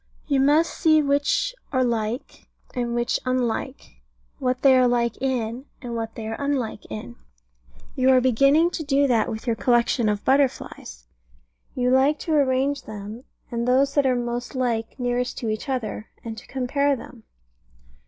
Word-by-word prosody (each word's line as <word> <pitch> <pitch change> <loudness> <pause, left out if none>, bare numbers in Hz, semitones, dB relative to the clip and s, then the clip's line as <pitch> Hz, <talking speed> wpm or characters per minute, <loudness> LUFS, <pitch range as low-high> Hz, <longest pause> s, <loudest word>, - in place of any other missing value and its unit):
You 280 -3 +1
must 295 +5 +3
see 315 -1 +4
which 285 - +1 0.2
are 260 -2 +2
like, 235 +1 -3 0.3
and 240 -2 -2
which 240 0 0
unlike; 255 +1 -3 0.4
what 255 -1 -1
they 270 -2 +7
are 255 -1 +5
like 235 -2 +1
in, 250 -1 -2
and 240 -3 -6
what 225 -1 -4
they 220 -1 -6
are 225 - -4
unlike 270 -7 -2
in. 120 +2 -7 0.8
You 260 -1 +3
are 260 -1 +6
beginning 275 +7 +4
to 330 - -4
do 285 -1 +2
that 235 -5 +2
with 220 +2 -6
your 235 -2 +1
collection 240 -1 +2
of 205 -1 -2
butterflies. 265 - 0 0.7
You 250 0 +1
like 270 +4 +4
to 320 - -2
arrange 275 0 +1
them, 215 +3 -8 0.3
and 235 0 -2
those 270 +2 +3
that 285 -2 +3
are 255 - +2
most 240 +1 -3
like 235 -3 -1
nearest 245 0 -1
to 230 - -3
each 215 +5 -4
other, 230 -4 -3 0.2
and 225 -1 -5
to - - -12
compare 275 +2 0
them. 230 -1 -11
250 Hz, 165 wpm, -24 LUFS, 230-275 Hz, 0.8 s, they